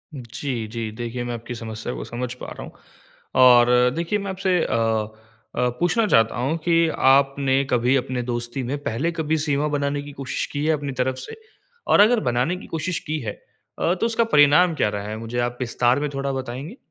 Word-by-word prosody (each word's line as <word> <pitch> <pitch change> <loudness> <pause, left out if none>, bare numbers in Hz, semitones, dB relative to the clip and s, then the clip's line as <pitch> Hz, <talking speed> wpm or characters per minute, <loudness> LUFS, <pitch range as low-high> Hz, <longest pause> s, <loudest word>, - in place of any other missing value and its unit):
जी, 120 -1 -5
जी। 110 0 -5
देखिए 120 +2 -5
मैं 120 0 -4
आपकी 120 +1 -6
समस्या 110 - -5
को - - -5
समझ 125 +1 -4
पा - - -5
रहा - - -8
हूँ। - - -10 0.7
और 125 0 +6
देखिए 170 +5 -1
मैं 200 -1 -4
आपसे 185 -1 +1
अ 115 -2 0 0.5
अ, 125 0 +1
पूछना 180 +6 +2
चाहता 115 - +3
हूँ 135 +7 0
कि 165 -1 +4
आपने 135 0 +3
कभी 125 +2 +2
अपने 125 -1 -2
दोस्ती 120 +2 -3
में 135 +4 -2
पहले 145 +10 -1
कभी 160 -1 -1
सीमा 150 -1 0
बनाने 145 -1 -1
की 145 0 -9
कोशिश 135 -2 -3
की 145 +1 -2
है 160 - +3
अपनी 145 -2 -3
तरफ 130 0 +1
से? 130 - -8 0.5
और - - +4
अगर 225 +3 +5
बनाने 125 +9 0
की - - -11
कोशिश 165 +2 -3
की 155 +1 -1
है 105 -3 -3 0.5
अ, 170 - +2
तो 190 - -1
उसका 230 0 +2
परिणाम 155 -2 +5
क्या 105 - +1
रहा 105 0 -5
है? 110 - -4
मुझे 115 +2 -4
आप 120 0 -1
विस्तार 125 +2 +1
में 145 0 -2
थोड़ा 135 0 -2
बताएँगी? 135 - -6
135 Hz, 200 wpm, -23 LUFS, 120-155 Hz, 0.7 s, और